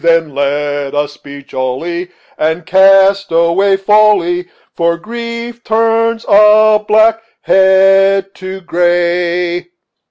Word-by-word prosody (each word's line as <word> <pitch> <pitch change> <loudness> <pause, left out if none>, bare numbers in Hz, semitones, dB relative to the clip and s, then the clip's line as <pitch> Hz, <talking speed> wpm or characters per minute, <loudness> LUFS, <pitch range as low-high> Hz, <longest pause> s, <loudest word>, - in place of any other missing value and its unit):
Then 165 -3 +1
let 145 0 -3
us 145 0 -3
be 140 0 -12
jolly 160 +8 -5 0.3
And 160 +2 -2
cast 195 +1 +3
away 170 +4 +1
folly, 195 -3 +1 0.3
For 170 0 -1
grief 235 +3 -8
turns 225 +1 0
a 215 +1 +4
black 220 +1 +2 0.2
head 195 +1 +2
to 190 0 -9
gray." 175 0 -1
190 Hz, 100 wpm, -12 LUFS, 170-210 Hz, 0.3 s, a